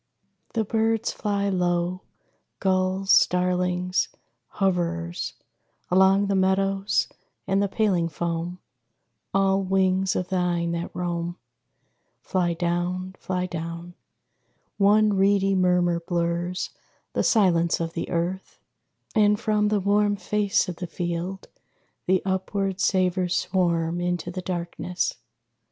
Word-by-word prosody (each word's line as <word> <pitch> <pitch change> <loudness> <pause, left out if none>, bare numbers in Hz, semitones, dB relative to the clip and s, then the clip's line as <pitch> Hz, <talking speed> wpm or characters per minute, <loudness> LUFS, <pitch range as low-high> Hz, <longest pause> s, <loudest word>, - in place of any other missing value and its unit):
The 225 - +2
birds 225 +1 +1
fly 200 -1 -1
low. 180 -1 0 0.6
Gulls, 190 0 +1
starlings, 180 0 +2 0.5
hoverers, 175 -2 -1 0.6
Along 190 +2 +5
the 200 - 0
meadows 195 +1 +1 0.4
and 195 +1 +1
the 200 - +2
paling 195 -5 +1
foam, 170 +2 -3 0.7
All 195 0 +2
wings 190 0 +1
of 180 - -2
thine 175 -2 0
that 170 0 -3
roam 175 0 -3 0.8
Fly 175 -3 0
down, 175 +2 -2
fly 180 -1 -2
down. 170 0 -6 0.9
One 210 +1 +5
reedy 195 0 +3
murmur 180 -2 +2
blurs 170 +1 -2 0.4
The - - +1
silence 175 -6 +3
of 165 -1 -3
the 165 - -4
earth; 175 +3 -3 0.6
and 210 -1 +4
from 210 -1 +1
the 210 0 +2
warm 205 +1 +2
Face 205 0 0
of 175 -2 -5
the 180 - -5
field 175 +2 -4 0.6
the 185 0 +2
upward 190 0 -1
savors 185 -2 +1
swarm 170 -2 0
Into 175 -1 -2
the 185 +1 -5
darkness. 180 0 -3
185 Hz, 110 wpm, -25 LUFS, 175-195 Hz, 0.9 s, Along